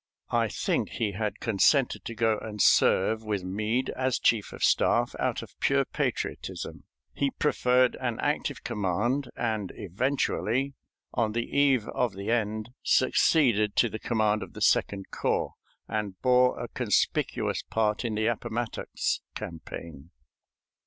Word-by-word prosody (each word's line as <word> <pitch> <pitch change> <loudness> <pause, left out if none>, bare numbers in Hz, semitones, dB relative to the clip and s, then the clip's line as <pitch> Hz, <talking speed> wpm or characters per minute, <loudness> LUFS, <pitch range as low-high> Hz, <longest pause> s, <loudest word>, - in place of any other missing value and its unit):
I - - +2
think - - -1
he 110 -3 -1
had 105 +2 -3
consented 120 +5 +2
to 115 - -5
go 110 -1 +2
and 105 -1 -7
serve 110 +2 +4
with 105 -3 -2
Meade 110 +7 -1
as 130 -1 0
chief 110 -3 +1
of - - -7
staff - - +3
out - - -1
of - - -13
pure - - +2
patriotism. - - -4 0.3
He 140 - 0
preferred 125 -3 +2
an 120 -3 -2
active - - -1
command, 105 +8 -1
and 110 -5 -2
eventually, 130 +5 -1 0.4
on 110 -3 0
the 120 +1 -1
eve 135 -5 +3
of 120 -6 -1
the 100 +3 -3
end, 110 -1 -1
succeeded 120 -6 +3
to 120 - +3
the 110 - -6
command 110 -2 +1
of - - -8
the - - -9
Second 100 -1 +1
Corps, - - -1 0.3
and 105 -3 -3
bore 125 0 +4
a 120 - -4
conspicuous 115 -6 0
part 110 0 0
in 115 -3 -2
the 110 +1 0
Appomattox 120 0 -2
campaign. 80 -2 -8
110 Hz, 140 wpm, -28 LUFS, 105-125 Hz, 0.4 s, serve